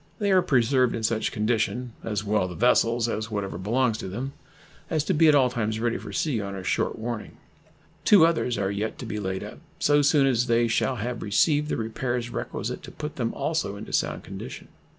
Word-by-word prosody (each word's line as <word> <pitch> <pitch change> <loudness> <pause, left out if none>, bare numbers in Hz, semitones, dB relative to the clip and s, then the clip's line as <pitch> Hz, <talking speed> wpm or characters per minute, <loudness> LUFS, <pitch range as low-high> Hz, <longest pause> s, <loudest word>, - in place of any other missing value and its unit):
They 205 -3 0
are 185 -1 +6
preserved 130 -3 +2
in 115 - -4
such 110 0 0
condition, 115 +3 -1
as 105 -2 -2
well 105 -3 +1
the 90 - -7
vessels 120 +1 +3
as 110 -1 -3
whatever 100 -4 -3
belongs 115 +3 +1
to - - -5
them, 125 +9 -5 0.6
as 155 -3 +1
to 190 - 0
be 165 0 +5
at 150 - +6
all 130 -3 +4
times 110 -2 -1
ready 115 0 0
for - - -8
sea 135 -9 0
on 100 -1 -5
a 95 - -6
short - - 0
warning. 115 -1 -5 0.7
Two 195 -6 +7
others 160 -7 +1
are 95 -1 0
yet 105 +2 -3
to - - -7
be 105 -2 -4
laid 95 -1 -3
up - - -9 0.2
so 145 0 +3
soon 145 -1 +4
as 125 -2 +2
they 120 0 +3
shall 125 +3 +1
have 120 +1 -4
received 145 +8 +2
the - - -1
repairs 120 +2 -2
requisite - - -4
to - - -10
put 150 0 -7
them 115 -3 -1
also 160 -11 -1
into 105 +2 -9
sound - - 0
condition. - - -8
120 Hz, 210 wpm, -26 LUFS, 110-135 Hz, 0.7 s, Two